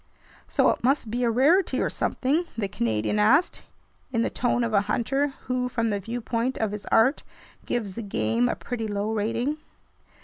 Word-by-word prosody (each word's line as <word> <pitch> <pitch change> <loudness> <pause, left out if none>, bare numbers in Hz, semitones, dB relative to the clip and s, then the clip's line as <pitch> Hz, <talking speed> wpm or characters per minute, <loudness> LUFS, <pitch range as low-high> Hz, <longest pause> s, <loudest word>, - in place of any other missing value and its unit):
"So - - +3
it - - -5
must 255 -3 +1
be 245 +2 -1
a 235 - +3
rarity 290 - +3
or - - 0
something?" 295 +7 0
the 210 -3 -1
Canadian 115 - -1
asked, 250 +11 +3 0.5
in 230 -2 +1
the - - -1
tone 245 0 0
of 230 -2 -2
a 200 - +5
hunter 270 +3 0
who, 250 0 -1
from 230 -2 0
the 205 - -1
viewpoint 230 +3 -2
of 220 -2 -1
his 210 -1 -7
art, 245 +6 +3 0.5
gives 215 -6 -2
the 230 - -5
game 115 - 0
a - - -1
pretty 225 -3 -4
low 205 +1 -2
rating. 230 +8 -1
230 Hz, 180 wpm, -25 LUFS, 210-255 Hz, 0.5 s, a